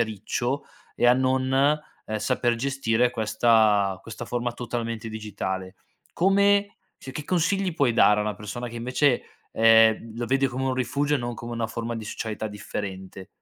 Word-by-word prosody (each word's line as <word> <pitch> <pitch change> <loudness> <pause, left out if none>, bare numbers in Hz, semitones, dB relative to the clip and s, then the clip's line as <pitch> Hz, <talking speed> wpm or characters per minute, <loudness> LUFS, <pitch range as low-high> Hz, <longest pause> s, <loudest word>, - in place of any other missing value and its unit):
a - - +4
riccio, 120 +6 -3 0.3
e - - +3
a 120 - +7
non, 130 0 +1
ehm, 140 -5 0
saper 120 +1 +1
gestire 125 -2 +1
questa 110 -3 +2
questa 115 +1 -8
forma 120 0 -2
totalmente 115 -2 -4
digitale. 95 -3 -5 0.4
Come 200 +2 +3 0.2
cioè, 130 - -9
che 150 - -6
consigli 185 +1 0
puoi 140 -8 +2
dare 105 -2 +5
a - - +1
una 105 - -2
persona 105 +4 -6
che 120 - -9
invece, 125 +2 +1 0.3
ehm, 115 0 +4
lo 120 - -2
vede 135 +1 +2
come 130 +1 -3
un 130 - 0
rifugio 140 +3 0
e - - -5
non 120 -1 -4
come 120 +1 -7
una 115 -1 -2
forma 115 +2 -4
di 110 - -6
socialità 110 0 -4
differente? 95 -2 -7
120 Hz, 170 wpm, -25 LUFS, 110-130 Hz, 0.4 s, a